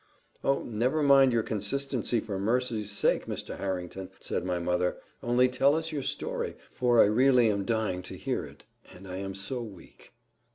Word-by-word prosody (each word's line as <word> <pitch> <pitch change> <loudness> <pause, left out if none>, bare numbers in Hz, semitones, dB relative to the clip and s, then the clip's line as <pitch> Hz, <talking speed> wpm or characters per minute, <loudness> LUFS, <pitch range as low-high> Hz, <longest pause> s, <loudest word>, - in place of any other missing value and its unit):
"Oh! 135 0 +1
never 125 +7 0
mind 135 -2 +6
your 115 -2 +2
consistency, 120 +3 -1
for 105 -3 -4
mercy's 115 0 0
sake, 105 - +1
Mr. - - -5
Harrington," 95 0 -4
said - - -3
my 90 -1 -1
mother, 90 +1 0 0.2
"only 120 +1 +3
tell 135 +3 +3
us 160 0 -2
your 150 -2 -2
story, - - -3 0.2
for 120 -2 +2
I - - +9
really 120 +1 +4
am 100 -1 -2
dying 110 -4 -1
to - - -8
hear - - -2
it, - - -13 0.3
and 95 +2 -12
I 90 0 -5
am 95 0 -5
so 100 +6 -2
weak." 105 -6 -12
115 Hz, 175 wpm, -29 LUFS, 95-125 Hz, 0.3 s, I